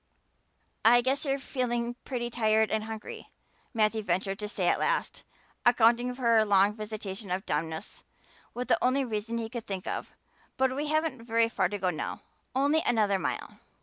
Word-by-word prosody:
"I 240 +2 +7
guess 270 +4 0
you're 275 -1 +1
feeling 240 -3 -2
pretty 240 -2 -3
tired 220 -2 +2
and 220 0 0
hungry," 220 -1 -8 0.4
Matthew 220 -1 +1
ventured 195 +1 -1
to 210 - -3
say 190 -3 -1
at - - +3
last, - - -1 0.4
accounting 240 +1 +4
for 255 - -9
her 230 -2 +5
long 200 -1 +4
visitation 210 -2 -6
of 185 +2 -2
dumbness 160 +5 -4 0.5
with 250 +1 -3
the - - +2
only 260 +2 +2
reason 225 0 -3
he 230 -1 -3
could 235 0 -7
think 190 -2 -4
of. - - -5 0.4
"But 260 -1 +2
we 295 +2 -2
haven't 310 -4 0
very 230 0 +2
far 185 - +1
to 205 - -3
go 185 -2 0
now 155 - -5 0.3
only 285 +4 +3
another 210 -4 +2
mile." - - -4
225 Hz, 175 wpm, -29 LUFS, 205-250 Hz, 0.5 s, I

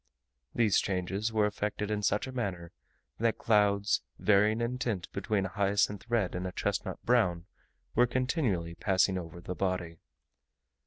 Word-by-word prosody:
These 110 -4 +4
changes 95 +3 -1
were 110 -1 +2
effected 105 0 -2
in 105 -1 -1
such 105 +1 +1
a 130 - -6
manner, 95 -9 -4 0.5
that 115 0 +1
clouds, 105 -1 +2 0.2
varying 105 +2 +3
in 120 +2 -2
tint 105 -9 -2
between 100 0 0
a - - -3
hyacinth 100 +2 0
red 115 -6 +1
and 90 +1 -3
a - - -4
chestnut - - -2
brown, 90 -9 +2 0.5
were 125 +2 +4
continually 120 - 0
passing 95 +1 +2
over 85 -1 -8
the 90 - -5
body. 90 -3 -2
100 Hz, 150 wpm, -30 LUFS, 90-110 Hz, 0.5 s, These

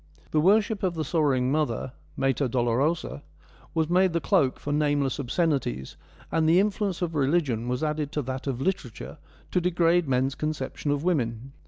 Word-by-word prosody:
The 155 - +3
worship 205 +4 +3
of 180 -3 0
the 160 -1 -2
sorrowing 135 -5 +1
mother 140 -4 -1
— - - -29
Mater 135 +1 +1
Dolorosa 130 +7 0 0.3
— - - -26
was 160 -1 +2
made 180 +1 +3
the 170 - +1
cloak 165 -9 +2
for 145 - -3
nameless 145 -3 +1
obsceni 145 +3 +1
ties, 65 +2 -6 0.4
and 160 -1 +2
the 170 +3 +6
influence 200 -2 0
of 170 -2 -2
religion 140 -5 +1
was 125 +3 -1
added 150 -1 -1
to 150 - -1
that 130 +2 -5
of 130 -3 -2
literature 165 - -3 0.3
to 180 - +2
degrade 175 -1 +2
men's 130 +1 +1
conception 150 -1 -3
of 145 +1 0
women. 130 -7 -1
150 Hz, 180 wpm, -26 LUFS, 130-170 Hz, 0.4 s, the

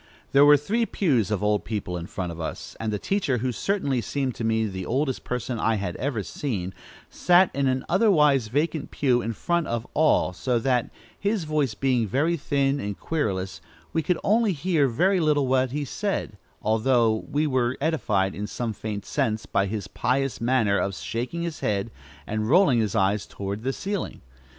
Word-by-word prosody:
There 140 +1 +6
were 145 0 +8
three 220 - 0
pews 130 - +1
of 105 -1 -1
old 105 -1 +2
people 100 -5 -4
in 85 -1 -5
front 95 -4 -4
of 85 - -9
us, 80 - -6
and 110 -1 -2
the 105 - -1
teacher, 160 - 0
who 125 +2 -1
certainly 140 - -1
seemed 135 +3 -2
to 115 - -6
me 110 0 +1
the 95 -3 -4
oldest 130 +6 -1
person 125 -1 -3
I 115 - +2
had 95 -4 -3
ever 125 -6 -2
seen, 95 - -4 0.3
sat 180 +1 +4
in 140 -1 +1
an 130 0 0
otherwise 150 - +4
vacant 150 +5 -1
pew 125 -4 +1
in 115 - -3
front 170 +8 -1
of 115 0 -2
all, 155 -11 +3
so 125 +6 0
that, 125 0 +1 0.3
his 205 -2 0
voice 150 -7 0
being 125 -2 +1
very 150 - +1
thin 140 -2 0
and 100 -4 -4
querulous, 95 - -2 0.3
we 160 - +2
could 170 +3 0 0.4
hear 155 -2 +2
very 180 +10 +2
little 150 -4 +2
that 130 0 +2
he 145 +3 -3
said, 195 - -3 0.3
although 110 0 +2
we 150 +3 +1
were 130 -3 0
edified 105 -11 0
in 105 +1 -4
some 115 +1 -3
faint 105 -1 -5
sense 115 -6 -1
by 100 0 +1
his 100 -2 -4
pious 135 +4 -1
manner 115 -5 +2
of 100 -1 -1
shaking 125 +13 -4
his 170 -3 -4
head 105 +1 -1 0.3
and 110 +1 -2
rolling 150 -6 +5
his 105 -4 0
eyes 100 +2 +1
toward 100 +1 -5
the 130 +3 -1
ceiling. 200 +5 -4
125 Hz, 185 wpm, -25 LUFS, 105-150 Hz, 0.4 s, were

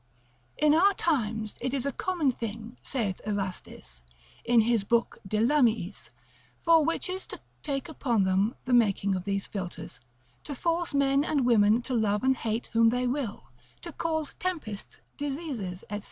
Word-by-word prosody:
In 300 -1 +4
our 390 +5 +5
times 220 -9 -1
it 260 +2 -1
is 265 -1 -1
a 280 - 0
common 330 -1 0
thing, 230 0 -6
saith 215 -8 -2
Erastus, 190 - -5 0.4
in 235 -1 +5
his 225 -2 +2
book 235 +3 +1
de 215 - -1
Lamiis, 230 - +1 0.5
for 330 -2 +5
witches 365 +4 -2
to - - -8 0.2
take 275 -1 -3
upon 245 -9 0
them 190 +4 +1
the 255 - 0
making 200 -4 +3
of 185 -1 -3
these 200 -1 -1
philters, 185 -4 -6 0.4
to 285 - -6
force 335 +2 -1
men 275 0 +3
and 285 -4 +1
women 225 -1 +4
to 255 - -4
love 215 -2 +1
and 265 0 +4
hate 225 +1 -2
whom 230 0 +5
they 250 +2 0
will, 245 - -3 0.3
to 340 - -7
cause 315 -1 -2
tempests, 305 - -5 0.2
diseases, 275 - -4
&c. 205 - -2
240 Hz, 160 wpm, -28 LUFS, 210-290 Hz, 0.5 s, our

